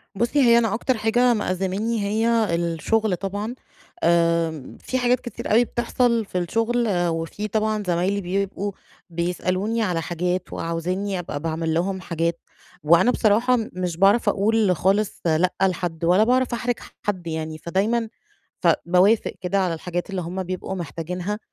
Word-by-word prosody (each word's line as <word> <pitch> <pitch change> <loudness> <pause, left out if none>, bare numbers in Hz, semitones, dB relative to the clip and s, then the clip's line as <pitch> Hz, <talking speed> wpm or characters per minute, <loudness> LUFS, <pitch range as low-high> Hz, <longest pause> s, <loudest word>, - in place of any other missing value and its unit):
بُصي 240 +7 +1
هي 235 -2 +6
أنا 225 -3 +2
أكتر 245 +2 0
حاجة 240 +3 +3
مأزّماني 205 +2 -1
هي 220 -2 +1
الشغل 175 +5 0
طبعًا، 205 +5 -4 0.5
آآ 165 -4 +1
في 260 - -3
حاجات 250 0 +2
كتير 240 - -6
أوي 235 +3 +5
بتحصل 235 -1 0
في 185 - -5
الشغل، 230 +6 0 0.2
وفي 165 +5 -3
طبعًا 215 0 0
زمايلي 180 +4 +1
بيبقوا 195 +2 -2 0.4
بيسألوني 185 +6 -1
على 180 -6 0
حاجات، 180 +2 -2
وعاوزينّي 180 +4 -2
أبقى 165 -4 -5
باعمل 160 +1 -2
لهم 185 +3 -1
حاجات، 170 -1 -2 0.4
وأنا 170 +9 +5
بصراحة 235 +4 +3 0.2
مش 180 -2 -3
باعرف 200 +5 +4
أقول 210 -2 +2
خالص 195 +6 0
لأ 170 +3 +2
لحد، 175 -3 -1
ولا 180 +5 +5
باعرف 250 +1 +2
أحرج 240 +1 -1 0.3
حد 185 -4 -3
يعني، 160 -1 -4
فدايمًا 205 +8 0 0.5
ف - - +4 0.2
باوافق 185 +6 +3
كده 190 +2 0
على 180 -3 +1
الحاجات 175 +3 -4
اللي 190 -2 -3
هُم 180 +3 -4
بيبقوا 185 +1 -4
محتاجينها. 180 +4 -4
190 Hz, 145 wpm, -23 LUFS, 170-220 Hz, 0.5 s, هي